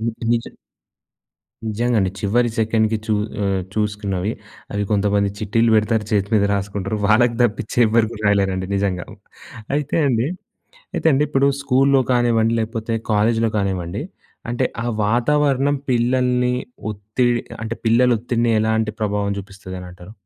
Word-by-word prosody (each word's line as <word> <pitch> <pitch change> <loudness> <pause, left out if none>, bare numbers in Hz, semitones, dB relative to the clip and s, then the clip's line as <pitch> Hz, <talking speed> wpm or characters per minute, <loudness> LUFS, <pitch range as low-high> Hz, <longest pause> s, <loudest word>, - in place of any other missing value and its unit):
హ్మ్. 115 0 -1 0.2
నిజ 115 -1 0 1.2
నిజంగండి. 110 -2 +1
చివరి 120 +4 +1
సెకండ్‌కి 110 0 +1
చూ 110 - +1 0.3
ఆహ్, 95 -1 0
చూసుకున్నవి 105 -2 -1 0.4
అవి 100 - 0
కొంతమంది 100 -1 +2
చిట్టీలు 115 +2 +2
పెడతారు, 110 0 +1
చేతి 100 -1 +1
మీద 100 - +3
రాసుకుంటారు. 100 +1 -2
వాళ్ళకి 115 +2 +4
తప్పిచ్చి 110 0 -2
ఎవరు 110 0 +3
గూడా 110 -1 -8
రాయలేరండి. 95 -2 +1
నిజంగా 95 -2 -1 0.7
అయితే 150 +1 -1
అండి 120 -1 +1 0.7
అయితే - - -1
అండి 135 - +3
ఇప్పుడు 140 -2 +2
స్కూల్‌లో 135 0 +3
కానివ్వండి, 115 -2 +2
లేకపోతే 115 0 -3 0.2
కాలేజ్‌లో 115 +2 +2
గానివ్వండి 95 +1 -2 0.5
అంటే 120 +2 0 0.2
ఆ - - -4 0.2
వాతావరణం 140 +5 +2
పిల్లల్ని 125 0 +2 0.4
ఒత్తిడ్ 110 +4 0 0.2
అంటే, 115 +1 -3
పిల్లల 115 +2 +4
ఒత్తిడిని 120 0 0
ఎలాంటి 110 0 +1
ప్రభావం 105 -1 0
చూపిస్తది 95 -1 -9
అనంటారు. 90 +2 -11
110 Hz, 125 wpm, -20 LUFS, 100-120 Hz, 1.2 s, వాళ్ళకి